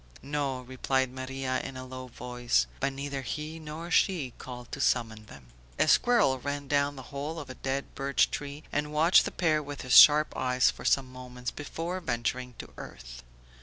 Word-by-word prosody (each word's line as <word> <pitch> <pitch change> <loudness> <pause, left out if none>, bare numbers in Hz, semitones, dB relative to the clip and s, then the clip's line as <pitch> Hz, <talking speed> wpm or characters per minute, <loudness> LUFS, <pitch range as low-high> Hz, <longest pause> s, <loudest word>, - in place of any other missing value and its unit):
"No," 140 -2 -2
replied 130 +1 -1
Maria 130 0 -3
in 130 - -7
a 130 - -7
low 130 0 -8
voice. 120 - 0
But 140 - 0
neither 140 0 -4
he 155 +5 -5
nor 160 +2 -7
she 165 - +2
called 125 -1 -9
to 140 - -5
summon 110 -5 0
them. 65 -7 -14 0.3
A - - +3
squirrel 235 - +4
ran 140 +2 -4
down 145 0 +1
the 130 - -9
bole 145 +5 -5
of 140 -4 -8
a 130 - -13
dead 135 +1 -3
birch 140 0 +1
tree 145 +1 -6
and 150 0 -1
watched 160 +4 +5
the - - -3
pair 155 -4 +1
with 145 -1 -7
his 125 - +2
sharp 150 +1 +7
eyes 125 0 +2
for - - -12
some 130 -2 +2
moments 125 -1 -7
before 165 +5 -5
venturing 125 -4 -3
to - - -10
earth. - - -10
135 Hz, 185 wpm, -29 LUFS, 125-150 Hz, 0.3 s, sharp